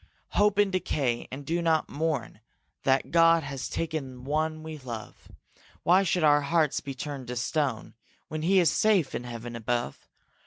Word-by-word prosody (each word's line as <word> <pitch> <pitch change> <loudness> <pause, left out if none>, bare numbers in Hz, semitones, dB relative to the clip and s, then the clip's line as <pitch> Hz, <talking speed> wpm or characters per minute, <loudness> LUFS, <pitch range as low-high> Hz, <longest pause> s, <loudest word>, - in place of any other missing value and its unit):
Hope 205 -1 +2
in 205 -1 +3
decay 145 -10 -1
and 140 +2 -7
do 170 +4 0
not 160 -2 +2
moan 145 -8 -2 0.5
That 135 0 +2
God 165 -1 +5
has 135 -2 -5
taken 140 -6 -4
one 155 +3 -1
we 160 -1 -7
love: 120 -5 -8 0.6
Why 180 +3 +5
should 180 -2 +1
our 145 -1 +5
hearts 155 0 +1
be 140 -2 -7
turned 140 -1 -6
to 125 - -4
stone 130 -1 -1 0.3
When 155 0 -4
he 190 +4 +4
is 170 -4 +4
safe 200 -10 +2
in 125 - -4
heaven 120 0 -7
above? 120 +1 -3
150 Hz, 165 wpm, -28 LUFS, 130-165 Hz, 0.6 s, God